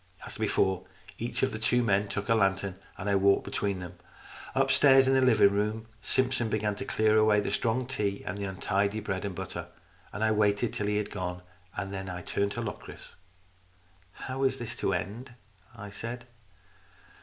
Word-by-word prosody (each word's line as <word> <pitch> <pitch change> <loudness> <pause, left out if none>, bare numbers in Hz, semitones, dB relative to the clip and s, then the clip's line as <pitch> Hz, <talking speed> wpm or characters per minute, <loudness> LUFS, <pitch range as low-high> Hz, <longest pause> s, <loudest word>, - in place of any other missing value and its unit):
As - - -5
before 95 -1 +1 0.3
each - - -2
of - - +2
the 110 - -5
two 120 +3 +3
men 100 -2 +2
took 105 0 -4
a 115 - +4
lantern, 100 -2 +1 0.2
and 100 - -5
I 100 - +2
walked 100 0 +4
between 100 -2 -2
them. 90 0 -9 0.6
Upstairs 135 -1 +6
in 135 - +3
the 130 - +4
living 115 -6 +5
room, 105 +2 -1 0.2
Simpson 130 +1 +1
began 105 -1 0
to - - -4
clear 110 0 +3
away 110 -1 +5
the 105 - -2
strong 120 +2 0
tea 105 -6 -2
and 90 - -3
the 100 -1 -4
untidy 100 +2 0
bread 100 -2 -3
and 100 -3 -4
butter. - - -5 0.4
I 110 +2 +1
waited 105 +1 +2
until 105 - -3
he 105 0 +1
had 105 - -2
gone, 90 -2 -4 0.3
and 100 0 -3
then 95 -1 -5
I 90 0 -6
turned 100 0 -1
to 120 - -3
Locris. 110 -3 -8 0.5
" 90 -1 -33
How 130 +1 -4
is 135 0 +2
this 120 -3 -5
to - - 0
end? 120 +6 -4 0.2
" 95 +4 -27
I 105 -2 -8
said. 120 +3 -6
105 Hz, 190 wpm, -29 LUFS, 95-115 Hz, 0.6 s, Upstairs